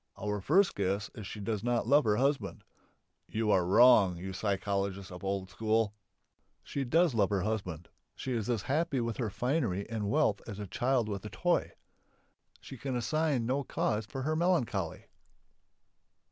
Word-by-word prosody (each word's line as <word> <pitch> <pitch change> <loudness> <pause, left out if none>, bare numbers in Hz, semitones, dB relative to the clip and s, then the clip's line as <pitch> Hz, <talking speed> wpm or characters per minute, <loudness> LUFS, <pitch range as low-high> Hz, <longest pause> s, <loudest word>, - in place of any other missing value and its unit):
Our 105 +1 -2
first 180 - +3
guess 100 +1 -1
is 105 -4 -8
she 105 - -7
does 105 0 -3
not 120 -1 +1
love 140 +3 +4
her 105 -1 +3
husband. 135 +4 0 0.6
You 110 -1 0
are 95 - +4
wrong, 100 -1 +6
you 95 +2 -6
psychologists 100 -1 -2
of 90 - -8
the 95 - -4
old 95 -1 -2
school! 110 -1 +1 0.7
She 140 - -3
does 165 +4 +3
love 105 -4 +2
her 100 -3 0
husband, 90 -6 -3 0.3
she 130 - -5
is 115 -1 -2
as 115 -5 0
happy 145 -1 0
with 115 -2 -2
her 115 -4 -1
finery 110 - -1
and 105 -3 -2
wealth 120 -6 +2
as 105 -4 -6
a 105 - -5
child 120 +4 0
with 100 -2 -4
a - - -5
toy; 175 +7 0 0.9
she 135 - -10
can 135 0 -3
assign 145 0 0
no 135 +4 0
cause 110 -4 -1
for 130 +4 -5
her 155 +3 0
melancholy. 130 - 0
110 Hz, 175 wpm, -31 LUFS, 100-130 Hz, 0.9 s, wrong